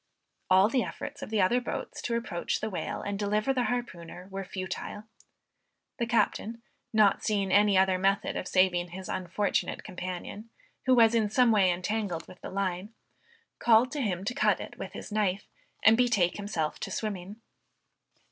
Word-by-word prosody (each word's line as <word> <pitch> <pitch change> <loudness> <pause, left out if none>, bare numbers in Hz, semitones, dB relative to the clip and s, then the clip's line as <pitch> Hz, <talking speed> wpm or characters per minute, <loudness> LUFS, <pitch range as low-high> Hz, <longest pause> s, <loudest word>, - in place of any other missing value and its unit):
All 190 +2 +6
the 250 +3 +1
efforts - - -7
of - - -6
the 215 -2 +1
other 240 +7 +2
boats 245 - -5
to 235 - -1
approach 205 -7 -2
the 220 - -3
whale, 185 - -4
and 200 -1 -3
deliver 210 +5 +1
the 250 -2 0
harpooner, 185 -7 -4
were 195 0 -4
futile. 185 +2 -6 1.0
The 235 - 0
captain, 230 0 0 0.3
not 215 -3 +4
seeing 200 -3 0
any 205 -1 +5
other 190 -1 +3
method 195 +1 +1
of - - -3
saving 180 -2 +2
his 185 +2 -8
unfortunate 185 +3 -1
companion, 185 +3 -6 0.4
who 255 - +6
was 230 -1 +6
in 220 -3 +2
some 245 +2 +4
way 200 -4 +4
entangled 180 -1 -2
with 180 - -14
the - - -6
line, 195 +2 -3 0.6
called 235 +2 +4
to 295 - -2
him 190 -6 -1
to 245 - -1
cut - - +2
it - - -8
with - - -6
his - - -8
knife, 205 -2 0 0.4
and 220 +2 +7
betake 225 -8 +2
himself 190 -7 -3
to - - -4
swimming. 200 -2 -4
205 Hz, 170 wpm, -29 LUFS, 185-225 Hz, 1.0 s, and